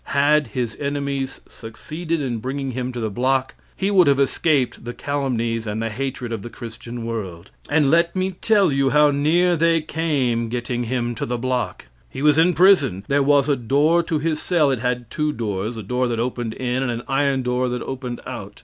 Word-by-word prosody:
Had 145 0 +4
his 115 0 -3
enemies 140 -2 -3
succeeded 155 +8 -5
in 125 -5 -2
bringing 135 +3 -3
him 125 0 -3
to 120 - -6
the 110 -2 -2
block, 130 +4 0 0.2
he 195 +1 -1
would 185 -5 +5
have 140 -1 +4
escaped 140 -1 +1
the 120 +1 -6
calumnies 120 -5 -2
and 105 +1 -3
the 115 0 -2
hatred 125 0 -4
of 110 - -4
the 120 - -7
Christian 120 0 -8
world. 95 -6 -5 0.2
And 145 -2 +3
let 170 +2 +3
me 185 0 0
tell 200 -1 +2
you 135 0 +2
how 150 +1 +5
neat 165 +4 +2
they 165 0 +4
came 140 -8 -1
getting 120 0 -2
him 120 0 -1
to 115 - -4
the 120 +1 -2
block. 125 - -2 0.2
He 135 - -6
was 150 +1 +5
in 170 +1 +4
prison, 145 - +4
there 140 +1 +3
was 140 0 +3
a 145 - +3
door 145 +7 +2
to 165 -1 -1
his 155 0 -1
cell 160 -6 +2
it 130 - -1
had 125 -1 -2
two 150 -1 0
doors, 110 -2 -3
a 110 - -6
door 125 +5 0
that 115 -1 -2
opened 120 -2 -2
in 125 0 -1
and 135 - -1
an 120 0 -4
iron 135 -1 +1
door 125 +1 0
that 125 0 -3
opened 125 -2 -5
out. 105 -2 -8
130 Hz, 205 wpm, -22 LUFS, 120-150 Hz, 0.2 s, would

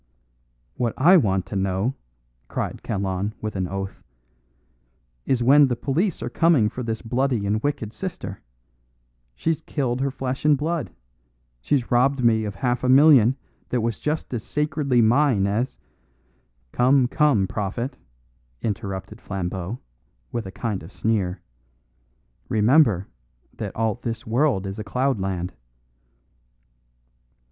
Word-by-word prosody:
"What 120 -2 -1
I 170 +8 +6
want 95 - +2
to - - -7
know," 95 +5 0 0.5
cried - - -4
Kalon, 100 0 -2
with 110 -1 -5
an 95 -1 -1
oath, 95 +1 -5 1.3
"is 125 -3 +2
when 140 +3 +7
the 125 - 0
police 155 - -1
are - - -3
coming 160 -11 +4
for 125 - -6
this 115 -2 -3
bloody 125 -2 0
and 105 +2 0
wicked 115 -6 -2
sister. 180 - -6 0.9
She's 160 - -1
killed 130 -4 -2
her 140 - +1
flesh 130 0 -4
and 150 -1 +5
blood; 155 - -2 0.7
she's 120 - -1
robbed 125 +2 +3
me 110 -2 +3
of 100 -2 -5
half 125 0 -1
a 130 - +1
million 135 -3 +7 0.3
that 125 - 0
was 115 0 -2
just 150 -2 -2
as 115 -3 -3
sacredly 145 -2 +1
mine 120 -3 +3
as 110 +6 -1 0.5
" - - -41
"Come, 130 +1 +4
come, 140 -8 +3
prophet," 110 +7 -3 0.7
interrupted 105 0 -4
Flambeau, 95 +2 -4 0.5
with 115 -4 -3
a - - -7
kind 100 0 -3
of 80 - -11
sneer; 100 -4 -1 1.1
"remember 110 - +4 0.5
that - - -6
all 110 -1 +1
this 115 +3 -5
world 115 -3 +1
is 95 +2 -5
a - - -3
cloudland." 95 -7 -1
115 Hz, 135 wpm, -23 LUFS, 100-135 Hz, 1.3 s, when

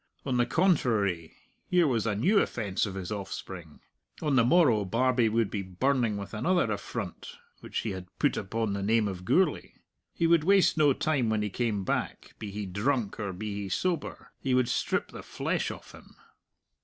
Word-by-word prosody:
On 130 -3 0
the 120 0 +2
contrary, 115 - +1 0.3
here 180 -2 +4
was 115 -6 +1
a 105 - 0
new 190 - +3
offence 105 - -1
of 95 - -6
his 95 +1 -5
offspring. 95 -5 -7 0.4
On 150 -3 0
the 120 - +5
morrow 125 -6 +4
Barbie 120 +3 +2
would 110 -2 +1
be 100 - -2
burning 115 +4 0
with 100 +2 -7
another 145 +2 +1
affront 100 -2 -5 0.2
which - - -4
he 110 - -3
had 95 -1 -7
put - - +2
upon 110 +1 -2
the 100 - -3
name 110 +1 +2
of 90 -2 -6
Gourlay. 175 - +1 0.4
He 170 - -1
would 165 -2 +4
waste 195 +2 +4
no 150 -3 +4
time 135 -5 0
when 110 -1 +1
he 105 - -3
came 110 -3 -1
back, - - -3
be 105 - -5
he 105 +1 -5
drunk 105 +3 -1
or 100 -2 -2
be 105 +3 -5
he 100 - -5
sober; 175 - -2
he 130 -2 0
would 125 -1 +2
strip - - -1
the - - -8
flesh - - -2
off - - -9
him. - - -16
115 Hz, 190 wpm, -28 LUFS, 100-135 Hz, 0.4 s, the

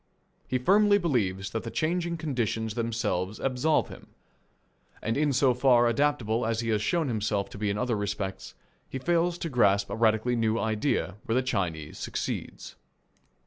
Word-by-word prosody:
He 130 - 0
firmly 205 +9 +4
believes 100 - -1
that 115 - -2
the 115 - -6
changing 170 +4 -1
conditions 115 -8 -2
themselves 110 -4 -2
absolve 135 +4 +1
him. - - -12 0.9
And 115 +1 -2
in 150 0 +2
so 130 0 +3
far 125 -1 +4
adaptable 120 -2 +1
as 115 0 0
he 115 - -3
has 105 -2 +1
shown 165 +7 0
himself 105 -4 -1
to - - -9
be 105 -1 0
in 100 - -1
other 125 0 0
respects, 100 -1 -4 0.3
he - - -4
fails 170 +4 +1
to 170 - -4
grasp 100 -8 +2
a - - -2
radically 115 +2 +2
new 115 -1 +1
idea 105 - -1
where 115 - 0
the 130 - +2
Chinese 80 -11 -3
succeeds. - - -5
115 Hz, 165 wpm, -28 LUFS, 105-135 Hz, 0.9 s, firmly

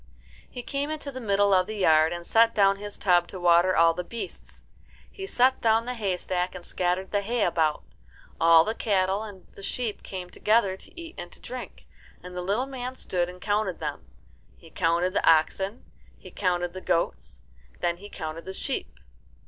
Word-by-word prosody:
He 245 - -7
came 280 +3 -2
into 305 -2 -4
the 260 -1 -7
middle 200 -2 +3
of 185 -1 +4
the 215 - -5
yard, 160 -4 +4
and 175 0 -5
set 230 +3 +4
down 195 -1 +4
his 205 0 -7
tub 175 -3 +3
to 185 - -8
water 175 +1 +4
all 165 0 +5
the 180 +2 -4
beasts. 230 +6 -9 0.5
He 390 0 -7
set 260 -5 +3
down 225 0 +3
the 250 - -2
haystack 185 -4 -2
and 175 -1 -6
scattered 180 +1 -1
the 205 - +1
hay 230 +2 0
about. 160 -3 +1 0.6
All 165 0 +7
the 220 - -1
cattle 195 -3 +1
and 205 -4 -9
the - - -12
sheep 225 +1 -3
came 180 -2 -7
together 210 -3 +2
to 265 - -13
eat 330 -1 -8
and 175 0 -7
to - - -13
drink, 245 -4 -8 0.4
and 180 0 -9
the 180 - -3
little 205 +8 0
man 260 -1 -6
stood 175 -7 -2
and 180 0 -11
counted 205 -2 -1
them. 150 -2 -5 0.5
He 165 - -16
counted 170 +2 +1
the - - +1
oxen, 190 +7 +2 0.3
he - - -13
counted 175 -2 -1
the 185 - -7
goats, 65 - -2 0.3
and - - -26
then 170 0 0
he 205 +3 -11
counted 160 -1 -6
the 190 - -6
sheep. 270 +7 -4
190 Hz, 195 wpm, -26 LUFS, 175-220 Hz, 0.6 s, All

